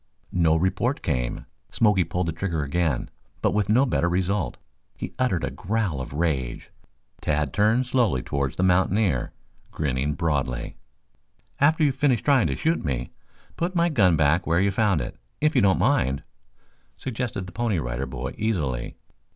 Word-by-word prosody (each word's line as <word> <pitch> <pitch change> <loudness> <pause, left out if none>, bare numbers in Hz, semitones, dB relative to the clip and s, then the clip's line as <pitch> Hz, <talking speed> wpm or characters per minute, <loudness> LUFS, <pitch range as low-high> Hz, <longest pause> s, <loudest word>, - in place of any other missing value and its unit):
No 85 -3 +3
report 95 - 0
came. 60 -6 -2 0.2
Smoky 105 -5 +3
pulled 85 +2 -2
the - - 0
trigger 80 -2 -2
again, 75 -1 -1 0.3
but - - +3
with 105 -1 0
no 125 +6 +5
better 105 -8 +1
result. 95 +1 -1 0.4
He - - -6
uttered 105 -10 +1
a - - -1
growl 100 -8 -2
of 65 - -7
rage. 70 -6 -2 0.5
Tad 75 -2 0
turned 110 +5 +3
slowly 115 - +1
towards 70 0 -2
the 90 - 0
mountaineer, 95 - +2 0.4
grinning 70 0 -1
broadly. 70 -7 -1 0.8
"After 155 +3 +4
you 145 - +5
have - - -11
finished 135 -6 +2
trying 140 -5 +4
to - - -1
shoot 165 +1 0
me, 65 -5 -3 0.5
put 175 +2 -2
my 170 0 +3
gun 95 - +4
back 80 +4 +2
where 85 +1 +3
you 100 +1 +2
found 100 -5 +2
it, - - -6 0.2
if 155 0 +2
you 130 - +5
don't 95 -2 +4
mind," 95 - +1 0.7
suggested 120 -6 -4
the 90 - -10
Pony 110 +1 0
Rider 65 -2 -3
Boy 65 0 -5
easily. 75 - -1
90 Hz, 165 wpm, -25 LUFS, 70-115 Hz, 0.8 s, no